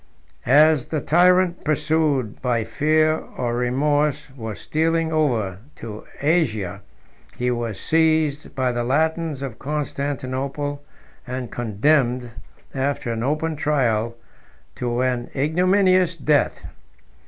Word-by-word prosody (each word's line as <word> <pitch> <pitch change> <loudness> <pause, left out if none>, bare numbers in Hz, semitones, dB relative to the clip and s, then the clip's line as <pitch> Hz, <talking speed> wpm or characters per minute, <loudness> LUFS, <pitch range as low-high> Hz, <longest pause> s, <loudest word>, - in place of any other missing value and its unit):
As 150 +1 +5
the 155 - -1
tyrant, 180 +3 +3
pursued 150 -6 0
by 120 -3 0
fear 155 +7 +2 0.2
or 120 -2 -1
remorse, 145 +4 0
was 110 -5 -6
stealing 165 +1 0
over 115 - 0 0.2
to 110 -2 -8
Asia, 135 - 0 0.6
he 125 0 0
was 120 -3 -3
seized 155 -2 +1
by 130 -2 +1
the 120 0 -2
Latins 155 +2 0
of 125 -5 -6
Constantinople, 140 0 -3 0.5
and 125 -1 -5
condemned, 120 +2 +1 0.4
after 135 -3 -1
an 115 -1 -3
open 155 +5 -1
trial, 120 -7 0 0.6
to 120 0 -1
an 125 -2 -1
ignominious 185 +4 +3
death. 145 -3 +1
140 Hz, 110 wpm, -22 LUFS, 120-155 Hz, 0.6 s, As